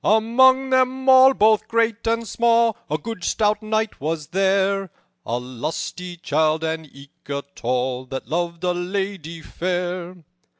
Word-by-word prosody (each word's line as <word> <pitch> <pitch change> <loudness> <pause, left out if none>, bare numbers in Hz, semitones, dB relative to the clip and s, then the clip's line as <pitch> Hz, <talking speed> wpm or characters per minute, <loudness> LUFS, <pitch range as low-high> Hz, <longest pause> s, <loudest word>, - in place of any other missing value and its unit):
"Among 260 +5 +4
them 260 +1 +1
all, 265 0 +7
both 215 0 +3
great 230 -1 0
and 230 0 0
small, 230 0 +2
A 155 - 0
good 210 +3 -7
stout 210 +3 +1
knight 215 -3 -2
was 155 +1 -2
there, 195 +1 +1 0.4
A 120 - -1
lusty 150 +8 -5
childe, 155 0 0
and 160 -1 -3
eke 140 +1 -17
a 140 0 -3
tall, 125 +1 -2
That 130 -3 -6
loved 170 +3 -3
a 180 - +2
lady 175 -3 -4
fair. 180 0 -3
185 Hz, 140 wpm, -22 LUFS, 160-225 Hz, 0.4 s, all